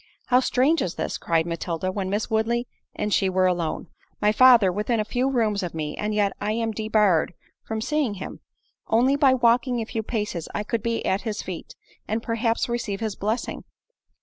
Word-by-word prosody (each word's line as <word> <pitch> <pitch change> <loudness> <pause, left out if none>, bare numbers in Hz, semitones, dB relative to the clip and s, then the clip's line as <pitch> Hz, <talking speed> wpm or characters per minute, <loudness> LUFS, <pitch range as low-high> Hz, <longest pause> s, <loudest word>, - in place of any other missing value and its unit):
"How 250 0 +6
strange 265 +5 +2
is 180 - -2
this!" - - -3
cried 165 -1 +1
Matilda, 170 +1 -3
when 190 -1 -3
Miss 205 +2 -1
Woodley 235 +2 0 0.3
and 210 - -1
she 195 - +3
were 185 0 +2
alone, 175 -3 -1 0.3
"My 210 0 +3
father 235 -4 +6
within 210 +5 -1
a 215 - 0
few 250 +4 0
rooms 220 -6 +1
of 175 -3 -5
me, 150 -2 -3
and 210 0 -2
yet 205 -2 +2
I 210 +1 0
am 225 0 -1
debarred 210 -6 +2 0.3
from 220 -1 -3
seeing 285 -4 0
him! 190 - -7 0.5
Only 250 +5 +3
by 275 -2 +4
walking 245 +1 +2
a 225 - -2
few 225 0 -3
paces 210 -7 -3
I 210 - -1
could 225 +1 -2
be 230 +1 -2
at 190 - +1
his 220 -3 -4
feet, 180 -3 -7 0.3
and 220 +2 -2
perhaps 230 0 0
receive 235 -5 -3
his 220 -3 -3
blessing!" 215 +4 -3
215 Hz, 195 wpm, -24 LUFS, 195-235 Hz, 0.5 s, How